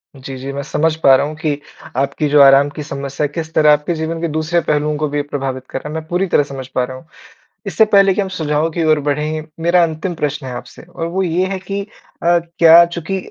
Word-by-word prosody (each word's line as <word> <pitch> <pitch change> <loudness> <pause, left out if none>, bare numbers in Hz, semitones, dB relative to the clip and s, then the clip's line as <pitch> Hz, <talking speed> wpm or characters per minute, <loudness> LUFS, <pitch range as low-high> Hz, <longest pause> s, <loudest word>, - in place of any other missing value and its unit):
जी, 135 0 -8
जी, 135 +2 -6
मैं 140 - -4
समझ 155 +2 0
पा 135 -3 +7
रहा 130 - +1
हूँ 155 - -7
कि 150 -2 -2 0.4
आपकी 140 +3 0
जो 145 0 +4
आराम 140 +1 +6
की 150 - -5
समस्या 140 0 -4
किस 160 +2 -6
तरह 150 -1 +5
आपके 150 +4 0
जीवन 160 +1 -4
के 170 - 0
दूसरे 160 +2 0
पहलुओं 150 0 0
को 150 0 -1
भी 145 0 -1
प्रभावित 135 -3 -5
कर - - -4
रहा - - -9
है। - - -7
मैं 160 0 -4
पूरी 180 +3 0
तरह 145 - +3
समझ 135 -2 -8
पा 125 - -1
रहा 130 +1 -6
हूँ। 130 - -15 0.6
इससे 220 - +3
पहले 195 -2 +4
कि 205 - 0
हम 195 - -2
सुझाव 155 -3 -1
की 165 0 -2
ओर 155 -1 +3
बढ़ें, 155 +2 -2
मेरा 170 +2 +3
अंतिम 165 +2 -2
प्रश्न 150 -3 -3
है 130 - -5
आपसे 120 0 -10
और 165 -1 -6
वो 185 +3 -2
ये 180 +1 0
है 190 - -3
कि 195 +2 -5 0.4
अ, 175 +1 +4 0.2
क्या 170 +1 +8
चूँकि 170 +2 -4
155 Hz, 245 wpm, -17 LUFS, 140-170 Hz, 0.6 s, क्या